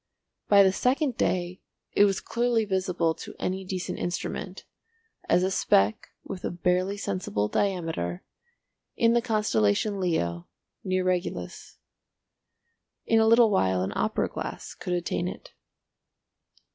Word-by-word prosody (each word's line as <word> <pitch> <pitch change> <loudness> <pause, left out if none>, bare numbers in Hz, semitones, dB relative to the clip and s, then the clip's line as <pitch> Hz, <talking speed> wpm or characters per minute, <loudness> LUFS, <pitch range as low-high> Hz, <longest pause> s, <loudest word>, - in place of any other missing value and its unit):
By 200 -1 +7
the 190 - +4
second 255 - +1
day 180 -2 -1 0.3
it 205 - +5
was 195 -2 0
clearly 235 -1 0
visible 185 -4 0
to - - -10
any 190 +1 -2
decent 185 -1 -4
instrument, 180 +1 -4 0.6
as 180 - +4
a 190 - +1
speck 105 - +2
with 185 -2 -7
a - - -1
barely 180 +3 0
sensible 185 - -2
diameter, 165 - -2 0.7
in 230 0 +3
the 240 - +3
constellation 210 - +1
Leo 85 - -1 0.4
near 185 -1 0
Regulus. 185 -1 -3 1.3
In 225 - +3
a 220 - +4
little 230 -1 +6
while 95 - +2
an 95 - -3
opera - - 0
glass - - -6
could 180 - -4
attain 175 0 -1
it. - - -8
185 Hz, 130 wpm, -27 LUFS, 175-205 Hz, 1.3 s, By